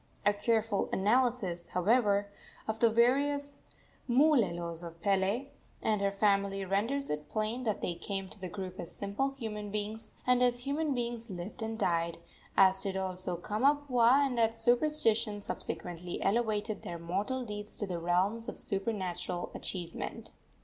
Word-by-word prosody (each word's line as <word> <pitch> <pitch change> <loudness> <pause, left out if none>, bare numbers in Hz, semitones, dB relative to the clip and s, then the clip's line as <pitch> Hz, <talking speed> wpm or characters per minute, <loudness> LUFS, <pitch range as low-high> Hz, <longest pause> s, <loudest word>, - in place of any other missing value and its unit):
A 205 - +5
careful 220 0 +1
analysis, 205 -5 +1
however, 200 +1 +3 0.4
of 220 0 -2
the 230 - +5
various 280 +5 +2 0.5
mooolelos 205 - +3
of 170 -1 -9
Pele 200 +8 +1 0.3
and 215 -2 +1
her 200 - +3
family 200 -1 +1
renders 225 +9 0
it 150 0 -4
plain 220 +4 -2
that 215 -3 0
they 175 - -1
came 195 +2 -4
to 205 - -9
the 185 -1 -5
group 185 0 -6
as 170 - -4
simple 205 +7 -1
human 220 -6 -5
beings, 210 +2 -3
and 250 0 +4
as 245 -1 +3
human 285 +2 0
beings 235 -1 -2
lived 180 +4 -6
and 220 0 -3
died, 170 -4 +1 0.4
as 190 0 +6
did 195 -1 -2
also 185 -1 -3
Kamapuaa, 255 - +3
and 250 -3 -1
that 225 0 +3
superstition 230 -3 +2
subsequently 175 -3 -4
elevated 215 0 0
their 170 - -5
mortal 200 +10 -2
deeds 210 -1 -6
to 205 - -1
the 180 -3 -3
realms 190 +7 +1
of - - -7
supernatural 185 -4 -2
achievement. 175 -3 -4
210 Hz, 150 wpm, -32 LUFS, 190-240 Hz, 0.5 s, as